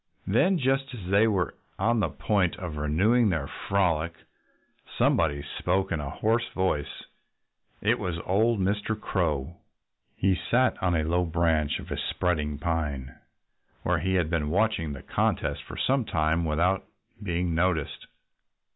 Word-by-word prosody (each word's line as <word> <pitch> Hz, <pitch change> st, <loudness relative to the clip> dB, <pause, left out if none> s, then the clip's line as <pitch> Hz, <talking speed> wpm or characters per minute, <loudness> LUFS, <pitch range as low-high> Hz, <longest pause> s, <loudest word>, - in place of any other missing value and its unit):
Then, 180 Hz, -, +3 dB
just 135 Hz, -1 st, 0 dB
as 100 Hz, -7 st, -8 dB
they 105 Hz, +3 st, +5 dB
were 95 Hz, -6 st, 0 dB, 0.2 s
on 115 Hz, +4 st, +2 dB
the 95 Hz, -6 st, +1 dB
point 90 Hz, +3 st, 0 dB
of 90 Hz, -6 st, -6 dB
renewing 95 Hz, +11 st, +3 dB
their 80 Hz, -6 st, -1 dB
frolic, 85 Hz, -1 st, 0 dB, 0.8 s
somebody 75 Hz, -3 st, +2 dB
spoke 95 Hz, +2 st, 0 dB
in 80 Hz, -, 0 dB
a 70 Hz, -1 st, -4 dB
hoarse 115 Hz, +9 st, 0 dB
voice. 95 Hz, -6 st, -1 dB, 0.8 s
It -, -, +2 dB
was 90 Hz, -2 st, -2 dB
old 110 Hz, +4 st, +2 dB
Mr. 105 Hz, +3 st, -1 dB
Crow. 80 Hz, -5 st, -1 dB, 0.6 s
He 95 Hz, 0 st, +2 dB, 0.2 s
sat 130 Hz, +2 st, +2 dB
on 90 Hz, -2 st, +2 dB
a 80 Hz, -, +1 dB
low 85 Hz, +3 st, +1 dB
branch 80 Hz, -3 st, +1 dB
of -, -, -10 dB
a -, -, -2 dB
spreading 75 Hz, -5 st, -1 dB
pine, 75 Hz, -4 st, -2 dB, 0.7 s
where -, -, +1 dB
he 95 Hz, 0 st, 0 dB
had 85 Hz, -3 st, +1 dB
been 75 Hz, -3 st, 0 dB
watching 90 Hz, -5 st, +1 dB
the 70 Hz, -, -9 dB
contest -, -, 0 dB
for -, -, -10 dB
some 135 Hz, -1 st, +2 dB
time 80 Hz, -3 st, 0 dB
without 85 Hz, +5 st, +1 dB, 0.4 s
being 90 Hz, -2 st, -1 dB
noticed. 85 Hz, -3 st, 0 dB
90 Hz, 145 wpm, -27 LUFS, 80-100 Hz, 0.8 s, they